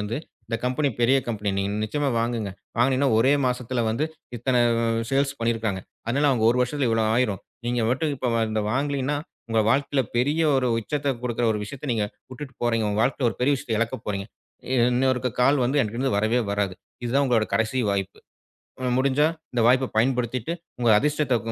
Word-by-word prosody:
வந்து 105 Hz, +3 st, -3 dB, 0.3 s
இந்த 115 Hz, -, -2 dB
கம்பெனி 130 Hz, +4 st, +1 dB
பெரிய 125 Hz, +3 st, +4 dB
கம்பெனி. 105 Hz, -3 st, -1 dB
நீங்க 100 Hz, +1 st, -1 dB
நிச்சயமா 145 Hz, +6 st, -1 dB
வாங்குங்க. 115 Hz, -3 st, -1 dB, 0.3 s
வாங்குனீங்னா, 130 Hz, +3 st, +3 dB
ஒரே 130 Hz, +5 st, +4 dB
மாசத்துல 125 Hz, 0 st, -1 dB
வந்து, 115 Hz, +7 st, 0 dB, 0.3 s
இத்தன 125 Hz, +1 st, +1 dB, 0.5 s
சேல்ஸ் 140 Hz, +1 st, +2 dB
பண்ணிருக்காங்க. 115 Hz, -4 st, -1 dB, 0.3 s
அதனால, 140 Hz, +6 st, +1 dB
அவங்க 115 Hz, -4 st, +1 dB
1 125 Hz, -, +1 dB
வருஷத்துல 130 Hz, +1 st, 0 dB
இவ்வளயாயிரும். 110 Hz, -2 st, +1 dB, 0.3 s
நீங்க 120 Hz, 0 st, 0 dB
மட்டும் 145 Hz, +4 st, 0 dB
இப்ப 130 Hz, -2 st, -2 dB, 0.2 s
இத 110 Hz, -, 0 dB
வாங்கலீன்னா, 140 Hz, +1 st, 0 dB, 0.3 s
உங்க 115 Hz, -1 st, +2 dB
வாழ்க்கல 140 Hz, 0 st, +2 dB, 0.2 s
பெரிய 145 Hz, +7 st, +2 dB, 0.2 s
ஒரு 130 Hz, -1 st, +1 dB
உச்சத்த 140 Hz, +5 st, -2 dB
கொடுக்குற 120 Hz, -1 st, -1 dB
ஒரு 105 Hz, -, -2 dB
விஷயத்த, 140 Hz, +5 st, -6 dB
நீங்க 110 Hz, -3 st, 0 dB, 0.2 s
வுட்டுட்டு 130 Hz, +1 st, -8 dB
போறீங்க. 115 Hz, -2 st, +1 dB
உங்க 105 Hz, +1 st, 0 dB
வாழ்க்கல 130 Hz, +1 st, +1 dB
ஒரு -, -, -9 dB
பெரிய 135 Hz, +3 st, +3 dB
விஷயத்த 120 Hz, -3 st, -3 dB
இழக்கப்போறீங்க. 110 Hz, -4 st, -2 dB, 0.6 s
இன்னொருக்க, 130 Hz, 0 st, +1 dB
கால் 135 Hz, +1 st, +4 dB
வந்து 135 Hz, +4 st, +1 dB
என்ட்ட 110 Hz, -2 st, -2 dB
இருந்து 130 Hz, -4 st, 0 dB
வரவே 110 Hz, +4 st, +2 dB
வராது. 100 Hz, -2 st, -1 dB, 0.3 s
இது 120 Hz, -, -2 dB
தான் 140 Hz, 0 st, +4 dB
உங்களோட 115 Hz, -4 st, +2 dB
கடசி 115 Hz, +3 st, +1 dB
வாய்ப்பு. 100 Hz, -1 st, -2 dB, 0.8 s
முடிஞ்சா, 140 Hz, +3 st, +3 dB, 0.3 s
இந்த 120 Hz, -, +1 dB
வாய்ப்ப 130 Hz, +1 st, +3 dB
பயன்படுத்திட்டு, 125 Hz, +3 st, 0 dB, 0.3 s
உங்க 120 Hz, -1 st, +2 dB
அதிர்ஷ்டத்த 150 Hz, -4 st, +1 dB
125 Hz, 165 wpm, -24 LUFS, 115-135 Hz, 0.8 s, பெரிய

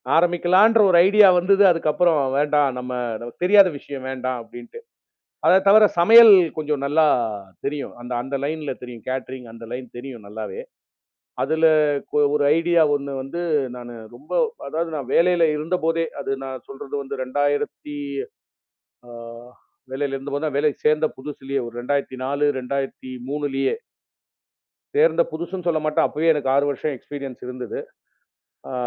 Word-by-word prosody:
ஆரம்பிக்கலான்ற 180 Hz, +6 st, +4 dB
ஒரு 175 Hz, -, +5 dB
ஐடியா 205 Hz, 0 st, +6 dB
வந்துது. 195 Hz, +3 st, +3 dB
அதுக்கு 165 Hz, -2 st, -1 dB
அப்புறம் 170 Hz, -1 st, +2 dB, 0.2 s
வேண்டாம். 145 Hz, -1 st, +2 dB
நம்ம 120 Hz, -2 st, -5 dB
தெரியாத 200 Hz, 0 st, +6 dB
விஷயம் 135 Hz, -2 st, -9 dB
வேண்டாம் 130 Hz, -1 st, -3 dB
அப்படின்ட்டு. 120 Hz, -, -12 dB, 0.7 s
அதை 185 Hz, -, +6 dB
தவிர 215 Hz, +2 st, +7 dB, 0.2 s
சமையல் 225 Hz, +4 st, +9 dB, 0.2 s
கொஞ்சம் 150 Hz, -2 st, -2 dB
நல்லா 155 Hz, +2 st, +3 dB, 0.6 s
தெரியும். 140 Hz, 0 st, -4 dB
அந்த 125 Hz, +1 st, -6 dB
அந்த 135 Hz, +3 st, -5 dB
லைன்ல 150 Hz, -2 st, -3 dB
தெரியும். 120 Hz, -3 st, -10 dB
கேட்டரிங் 130 Hz, -1 st, -5 dB
அந்த 115 Hz, 0 st, -11 dB
லைன் 125 Hz, 0 st, -6 dB
தெரியும், 120 Hz, -4 st, -9 dB
நல்லாவே. 110 Hz, -, -7 dB, 0.8 s
அதுல 160 Hz, +1 st, +1 dB, 0.7 s
ஒரு 145 Hz, -, +1 dB
ஐடியா 170 Hz, 0 st, +3 dB
ஒண்ணு 140 Hz, -1 st, -5 dB
வந்து. 135 Hz, +6 st, -6 dB, 0.3 s
நானு 120 Hz, -1 st, -9 dB, 0.2 s
ரொம்ப 140 Hz, +5 st, -17 dB, 0.4 s
அதாவது 165 Hz, +1 st, -3 dB
நான் 135 Hz, -3 st, -5 dB
வேலையில 175 Hz, -1 st, +4 dB
இருந்தபோதே 165 Hz, +1 st, -1 dB, 0.2 s
அது 135 Hz, -, -4 dB
நான் 130 Hz, -2 st, -8 dB
சொல்றது 135 Hz, 0 st, -10 dB
வந்து. 140 Hz, 0 st, -7 dB
2000த்தி 145 Hz, +2 st, -2 dB, 1.1 s
அ -, -, -13 dB, 0.8 s
வேலையில 135 Hz, 0 st, -2 dB
இருந்தபோதே 145 Hz, +3 st, -3 dB
வேலைக்கு 145 Hz, 0 st, -1 dB
சேர்ந்த 155 Hz, +1 st, +3 dB
புதுசுலயோ. 135 Hz, -1 st, -5 dB
2004 135 Hz, +2 st, -2 dB
2003 135 Hz, -, -3 dB, 1.2 s
சேர்ந்த 485 Hz, +3 st, +4 dB
புதுசுன்னு 180 Hz, 0 st, -6 dB
சொல்லமாட்டேன். 155 Hz, -2 st, +1 dB
அப்பவே 160 Hz, +2 st, +1 dB
எனக்கு 145 Hz, -3 st, -2 dB
6 140 Hz, -, +3 dB
வருஷம் 145 Hz, +1 st, -3 dB
எக்ஸ்பீரியன்ஸ் 140 Hz, -2 st, -9 dB
இருந்தது. 125 Hz, -3 st, -6 dB, 0.9 s
ஆ, -, -, -6 dB
145 Hz, 125 wpm, -22 LUFS, 130-165 Hz, 1.2 s, சமையல்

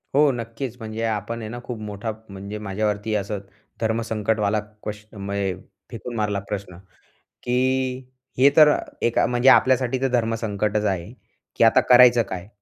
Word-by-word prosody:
हो. 145 Hz, 0 st, +5 dB
नक्कीच. 120 Hz, +1 st, -5 dB
म्हणजे 110 Hz, 0 st, -5 dB
आपण 110 Hz, +1 st, -3 dB
आहे 110 Hz, -, -6 dB
ना, 120 Hz, +2 st, -6 dB
खूप 120 Hz, -2 st, -6 dB
मोठा 105 Hz, +1 st, -4 dB, 0.2 s
म्हणजे 100 Hz, +2 st, -7 dB
माझ्यावरती 105 Hz, +1 st, -2 dB
असं 100 Hz, 0 st, -2 dB, 0.4 s
धर्मसंकटवाला 110 Hz, -2 st, 0 dB, 0.2 s
क्वेशमय 100 Hz, -2 st, -4 dB, 0.4 s
फेकून 120 Hz, +1 st, -7 dB
मारला 105 Hz, -2 st, -1 dB
प्रश्न, 100 Hz, -4 st, -5 dB, 0.7 s
की 130 Hz, +1 st, 0 dB, 0.3 s
हे 135 Hz, +3 st, +7 dB
तर 150 Hz, -1 st, +8 dB, 0.3 s
एका 120 Hz, -, +2 dB
म्हणजे 125 Hz, +2 st, +3 dB
आपल्यासाठी 130 Hz, -1 st, +4 dB
तर 135 Hz, -, +2 dB
धर्मसंकटच 110 Hz, -3 st, 0 dB
आहे, 95 Hz, +1 st, -2 dB, 0.4 s
की -, -, +3 dB
आता 115 Hz, -, +6 dB
करायचं 125 Hz, -1 st, +7 dB
काय? 90 Hz, 0 st, -6 dB
110 Hz, 140 wpm, -23 LUFS, 105-120 Hz, 0.7 s, तर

